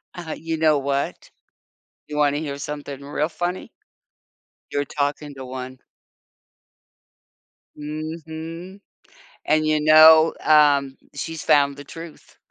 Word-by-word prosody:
Uh-huh 170 Hz, -3 st, -7 dB
you 165 Hz, 0 st, -4 dB
know 155 Hz, -1 st, +3 dB
what? 140 Hz, 0 st, -3 dB, 0.8 s
You 150 Hz, -, -6 dB
wanna 145 Hz, -1 st, +2 dB
hear 145 Hz, -3 st, -5 dB
something 145 Hz, -1 st, -7 dB
real 145 Hz, +2 st, -2 dB
funny? 175 Hz, +2 st, -4 dB, 1.0 s
You're 145 Hz, 0 st, -1 dB
talking 145 Hz, +1 st, -3 dB
to 135 Hz, -1 st, -8 dB
one. 130 Hz, 0 st, -8 dB, 2.0 s
Mhm. 160 Hz, +4 st, -7 dB, 0.7 s
And, 155 Hz, 0 st, +2 dB
you 155 Hz, 0 st, +2 dB
know, 155 Hz, +1 st, +7 dB
um, 145 Hz, -3 st, +4 dB, 0.2 s
she's 160 Hz, +3 st, -5 dB
found 140 Hz, -1 st, +3 dB
the 145 Hz, -, -10 dB
truth. 165 Hz, +2 st, -12 dB
150 Hz, 110 wpm, -22 LUFS, 140-160 Hz, 2.0 s, know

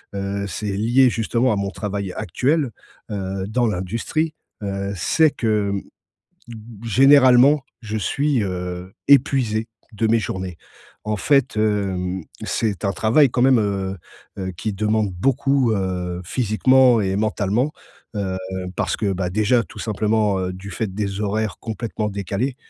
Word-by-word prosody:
heu, 100 Hz, 0 st, -2 dB
c'est 105 Hz, +1 st, -4 dB
lié 120 Hz, +6 st, +4 dB
justement 115 Hz, +2 st, +1 dB
à -, -, 0 dB
mon 100 Hz, -1 st, -2 dB
travail 100 Hz, -3 st, -4 dB
actuel, 130 Hz, -, 0 dB, 0.4 s
heu, 95 Hz, -1 st, -3 dB
dans 120 Hz, +3 st, +1 dB
l'industrie, 115 Hz, -, -2 dB, 0.3 s
heu, 100 Hz, 0 st, -3 dB
c'est 155 Hz, -, +3 dB
que, 105 Hz, -3 st, 0 dB
mmh, 100 Hz, -1 st, -2 dB, 0.7 s
mmh, 110 Hz, 0 st, -12 dB
généralement, 135 Hz, +3 st, +6 dB, 0.2 s
je 110 Hz, -1 st, -4 dB
suis, 135 Hz, +3 st, 0 dB
heu, 90 Hz, 0 st, -5 dB, 0.2 s
épuisé 125 Hz, -6 st, +3 dB, 0.3 s
de 110 Hz, +1 st, 0 dB
mes 115 Hz, +1 st, +3 dB
journées. 95 Hz, -4 st, -4 dB, 0.5 s
En 105 Hz, 0 st, -1 dB
fait, 130 Hz, +3 st, +2 dB
hem, 95 Hz, -4 st, 0 dB, 0.2 s
c'est 105 Hz, -3 st, -1 dB
un 100 Hz, -, +1 dB
travail 115 Hz, +9 st, +4 dB
quand 120 Hz, -, 0 dB
même, 130 Hz, -1 st, +5 dB
heu, 100 Hz, -2 st, -1 dB, 0.4 s
heu, 95 Hz, -1 st, -3 dB
qui 105 Hz, +3 st, -3 dB
demande 105 Hz, +1 st, 0 dB
beaucoup, 135 Hz, +5 st, +1 dB
heu, 90 Hz, -3 st, -2 dB
physiquement 125 Hz, +3 st, +4 dB
et 95 Hz, -1 st, 0 dB
mentalement, 110 Hz, +5 st, 0 dB, 0.4 s
heu, 95 Hz, -2 st, -2 dB, 0.4 s
parce -, -, 0 dB
que, 100 Hz, -3 st, 0 dB
bah, 90 Hz, -1 st, -2 dB
déjà 110 Hz, +4 st, +2 dB
tout -, -, -13 dB
simplement, 105 Hz, -1 st, +1 dB
heu, 90 Hz, 0 st, -2 dB
du 95 Hz, +2 st, -9 dB
fait 110 Hz, -4 st, -3 dB
des 100 Hz, -1 st, -3 dB
horaires 105 Hz, -1 st, -1 dB
complètement 110 Hz, -1 st, -3 dB
décalées, 100 Hz, +6 st, -2 dB
105 Hz, 145 wpm, -21 LUFS, 95-120 Hz, 0.7 s, généralement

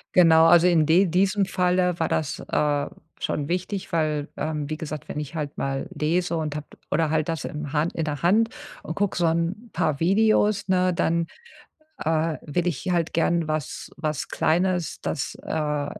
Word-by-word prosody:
Genau. 165 Hz, -2 st, +7 dB
Also, 175 Hz, +1 st, +6 dB
in 165 Hz, -3 st, +4 dB
de 170 Hz, +5 st, +5 dB
diesem 190 Hz, +3 st, +2 dB
Falle 180 Hz, -1 st, +1 dB
war 160 Hz, -, +1 dB
das, 155 Hz, -2 st, -1 dB
äh, 145 Hz, -1 st, +1 dB, 0.3 s
schon 145 Hz, -1 st, -2 dB
wichtig, 185 Hz, +2 st, -3 dB
weil, 155 Hz, -3 st, 0 dB
ähm, 150 Hz, -2 st, -3 dB
wie 155 Hz, -, -3 dB
gesagt, 155 Hz, -3 st, -6 dB
wenn -, -, -3 dB
ich 150 Hz, +2 st, -6 dB
halt 150 Hz, -2 st, -4 dB
mal 135 Hz, 0 st, -2 dB
lese 170 Hz, +2 st, 0 dB
und 155 Hz, -2 st, -3 dB
habe 150 Hz, -1 st, -5 dB, 0.2 s
oder 160 Hz, -1 st, +1 dB
halt 155 Hz, 0 st, +1 dB
das 165 Hz, -1 st, -2 dB
im 150 Hz, 0 st, -5 dB, 0.3 s
in 165 Hz, -, -2 dB
der 145 Hz, -3 st, -3 dB
Hand 215 Hz, +6 st, +4 dB, 0.3 s
und 165 Hz, -, -5 dB
gucke 205 Hz, -1 st, 0 dB
so 175 Hz, -, +2 dB
'n 170 Hz, +8 st, -1 dB
paar 155 Hz, -5 st, 0 dB
Videos, 205 Hz, +2 st, +3 dB
ne, 185 Hz, -1 st, +3 dB
dann, 170 Hz, 0 st, +1 dB, 0.8 s
äh, 160 Hz, 0 st, +1 dB
will 175 Hz, +4 st, -2 dB
ich 175 Hz, +2 st, -2 dB
halt 170 Hz, -2 st, 0 dB
gern 170 Hz, 0 st, +1 dB
was 155 Hz, -2 st, -4 dB
was 155 Hz, -2 st, -2 dB
Kleines, 175 Hz, +1 st, 0 dB
das, 145 Hz, -, -3 dB
äh 150 Hz, -2 st, -1 dB
165 Hz, 175 wpm, -24 LUFS, 155-180 Hz, 0.8 s, Genau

